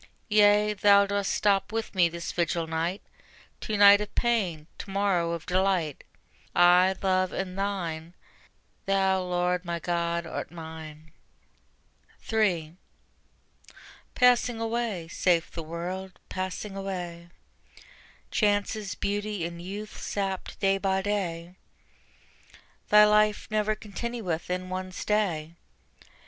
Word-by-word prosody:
Yea, 210 0 +5
Thou 200 0 +5
dost 200 0 -1
stop 200 -1 +1
with 225 0 -3
me 175 -3 +4
this 170 0 -5
vigil 170 -1 -1
night; 165 +4 -2 0.6
To 215 - -3
night 205 0 +8
of 210 - -7
pain, 195 -11 0
to - - -7
morrow 190 -4 +1
of 165 -1 -5
delight: 180 -5 0 0.5
I, 180 +2 +6
Love, 185 -1 +2
am 190 -1 -4
Thine; 180 -4 -3 0.7
Thou, 190 -1 +2
Lord, 180 0 0
my 170 -1 -3
God, 170 0 -1
art - - -5
mine. 160 -2 -10 1.1
3. 180 -7 0 1.4
Passing 245 -2 +3
away, 225 -6 -2
saith 170 0 +1
the 165 - -5
World, 180 +4 -6
passing 185 +2 -4
away: 175 -3 -5 1.0
Chances, 205 -1 0
beauty 205 -2 -2
and 170 0 -6
youth 205 +4 -7
sapped 195 -2 -3
day 195 -1 +2
by 190 -1 0
day: 180 -4 -3 1.3
Thy 210 0 +8
life 210 0 +3
never 215 0 +1
continueth 210 -5 -4
in 185 0 -2
one 185 0 -4
stay. 180 -6 -1
190 Hz, 115 wpm, -27 LUFS, 170-205 Hz, 1.4 s, night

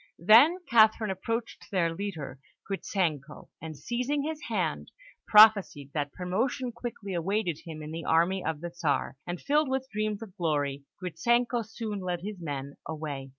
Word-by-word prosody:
Then 250 - +8
Catherine 220 -2 +4
approached 225 +5 -4
their 170 -5 +1
leader, 165 -8 -5 0.3
Gritzenko, 165 -7 -2
and, 160 -2 -7
seizing 250 - -1
his 310 0 -4
hand, - - -1 0.4
prophesied 210 -10 +6
that 145 -2 -2
promotion 230 - -2
quickly 230 -4 -6
awaited 180 -1 -1
him 155 -2 -7
in 150 - -7
the 165 +1 -5
army 170 +4 +2
of 160 -2 -3
the 175 0 -5
Czar; 150 -5 -1
and 175 0 -4
filled 295 0 +1
with 265 0 -1
dreams 215 0 -2
of 195 -4 -12
glory, 145 -5 -1
Gritzenko 235 +8 +1
soon 220 -2 -5
led 180 -2 -3
his 200 -1 -6
men 140 -3 -5
away. 150 -4 -5
190 Hz, 150 wpm, -28 LUFS, 160-225 Hz, 0.4 s, Then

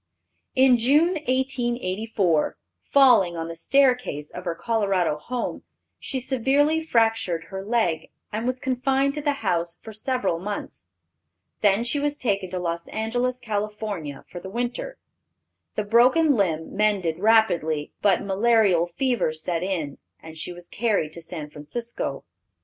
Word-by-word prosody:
In 260 -2 +5
June, 290 +8 +4
1884, 240 - 0 0.3
falling 245 -11 +5
on 165 0 -4
the 165 - -6
staircase 250 - +1
of 180 +1 -8
her 170 -1 -2
Colorado 195 -7 +1
home, 245 +9 -4 0.4
she 265 - -3
severely 275 +5 +2
fractured 225 - +1
her 190 0 -5
leg, 195 -8 0 0.2
and 220 +3 -2
was 255 0 -1
confined 265 +2 +1
to 300 - -4
the 290 -1 +1
house 170 -2 0
for 220 - -9
several 215 -6 -1
months. 185 - -6 0.7
Then 205 +1 +3
she 245 +5 0
was 290 0 -1
taken 200 -7 -1
to 185 - -4
Los 170 -1 -3
Angeles, 245 +3 -1
Cal., 215 -3 -2
for 180 -7 -6
the 190 - -8
winter. 245 - -3 0.8
The 210 - 0
broken 255 +8 +4
limb 165 -6 -1
mended 195 -6 +1
rapidly, 175 -9 +2
but 200 -3 +3
malarial 200 -3 +3
fever 250 - +1
set 165 +2 -3
in, 170 -7 -3 0.2
and 160 0 -11
she 160 +2 -5
was 175 0 -11
carried 205 -9 0
to 170 - -9
San 160 -3 -7
Francisco. 150 - -5
210 Hz, 140 wpm, -24 LUFS, 175-250 Hz, 0.8 s, In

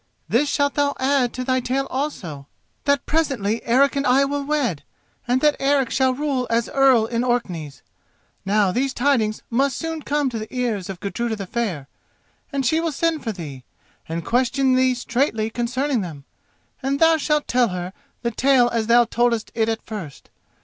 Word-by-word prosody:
This 285 +5 +2
shalt 285 0 +1
thou 285 -1 +1
add 260 -2 +2
to 255 - -4
thy 255 0 +1
tale 260 +2 -1
also, 175 - -4 0.4
that 280 -1 +2
presently 255 -9 0
Eric 275 +4 +3
and 280 0 0
I 265 +2 +4
will 285 +1 -2
wed, 275 - -1 0.5
and 250 +2 +2
that 300 -1 +4
Eric 275 -2 +2
shall 260 -1 +2
rule 275 -3 -1
as 230 0 +1
Earl 265 -5 +4
in 230 +1 -1
Orkneys. 180 - -2 0.6
Now 200 -1 +2
these 265 +5 -1
tidings 240 -5 +1
must 265 +2 +1
soon 325 -1 -4
come 290 -1 0
to 230 - -4
the 215 - -8
ears 230 -7 -2
of 190 -2 -6
Gudruda 225 +3 -2
the 200 -2 -6
Fair, 185 - -3 0.6
and 275 -2 -1
she 315 +7 +2
will 330 -1 -1
send 320 +1 -1
for 225 - -2
thee, 150 -9 -8 0.5
and 165 0 -4
question 255 +2 +2
thee 255 0 +3
straightly 235 -2 -1
concerning 250 +2 -1
them, 155 -7 -7 0.6
and 275 +1 -1
thou 325 0 +5
shalt 300 -1 0
tell 245 -1 +3
her 180 -1 -5 0.3
the 235 - 0
tale 255 0 +3
as 230 -2 -1
thou 240 +1 +6
toldest 235 -1 0
it 225 -1 +1
at 225 -1 -3
first. 190 -10 -8
250 Hz, 180 wpm, -22 LUFS, 220-275 Hz, 0.6 s, thou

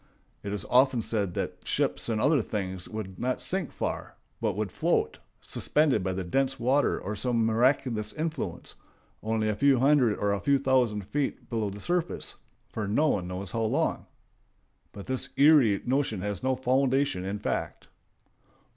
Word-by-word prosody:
It 100 - -5
is 105 - -3
often 125 -2 +4
said 100 -6 -1
that - - -3
ships - - -1
and 110 -2 0
other 145 +3 +3
things 95 -4 -4
would 95 -4 -6
not 130 +1 -1
sink 190 -5 -3
far, - - -4 0.3
but - - 0
would - - -2
float, - - 0 0.2
suspended 145 -9 +1
by 95 0 -1
dense 130 +10 0
water 130 +4 +2
or 105 +3 -4
some 115 +1 +1
miraculous 115 -1 +1
influence, 160 +1 -4 0.5
only 110 0 0
a 105 - 0
few 140 +3 +4
hundred 130 -4 +3
or 100 - 0
a 100 - -1
few 140 +7 +3
thousand 125 -7 +1
feet 135 -4 -3
below 110 -3 -1
the 100 +1 -8
surface, 175 +6 -2 0.3
for 110 -2 -4
no 150 +10 +2
one 90 -9 -1
knows 90 +1 -5
how 115 - -2
long. 110 - 0 0.8
But 100 - -9
this 130 -1 -2
eerie 140 -8 +5
notion 130 -6 0
has 100 -1 -3
no 130 0 +1
foundation 130 -4 +1
in 100 +2 -3
fact. - - -3
115 Hz, 165 wpm, -28 LUFS, 105-135 Hz, 0.8 s, eerie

